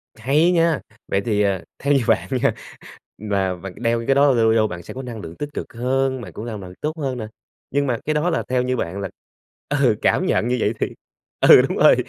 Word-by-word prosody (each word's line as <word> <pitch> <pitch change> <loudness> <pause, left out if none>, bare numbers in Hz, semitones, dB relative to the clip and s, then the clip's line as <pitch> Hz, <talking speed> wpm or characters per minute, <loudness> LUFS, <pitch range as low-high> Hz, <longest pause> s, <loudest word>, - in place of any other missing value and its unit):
Hay 145 +10 +2
nha. 165 -3 +2 0.3
Vậy 95 - 0
thì, 105 -3 +1
ờ, 100 -3 +1 0.2
theo 140 +1 +2
như 135 -3 +3
bạn - - +2
nha, - - +3 0.6
là 100 -3 -1
và 90 +2 -8
c - - -12
đeo 115 -1 -1
cái 135 - +4
đó 140 0 +5
lâu 115 -3 +3
lâu 110 -1 +3
bạn 90 -4 -7
sẽ - - -9
có 130 - -6
năng 120 -3 -7
lượng 80 -2 -9
tích 145 - -3
cực - - -6
hơn, 130 +2 0
bạn 90 -7 -9
cũng 105 - -7
làm 110 -3 -5
bạn 90 -1 -9
tốt 155 +2 -2
hơn 135 -4 -2
nè, 110 -3 -5 0.4
nhưng 140 +1 +1
mà 120 -3 0
cái 155 - +1
đó 150 +3 +1
là 165 - 0
theo 125 0 +2
như 130 0 0
bạn 95 -1 -3
là 100 - -3 0.6
ừ, - - +3
cảm - - +2
nhận 115 - +1
như 125 +1 +1
vậy 105 0 +1
thì - - +1 0.5
ừ, - - +8
đúng - - -2
rồi, - - +7
120 Hz, 250 wpm, -21 LUFS, 105-140 Hz, 0.6 s, ừ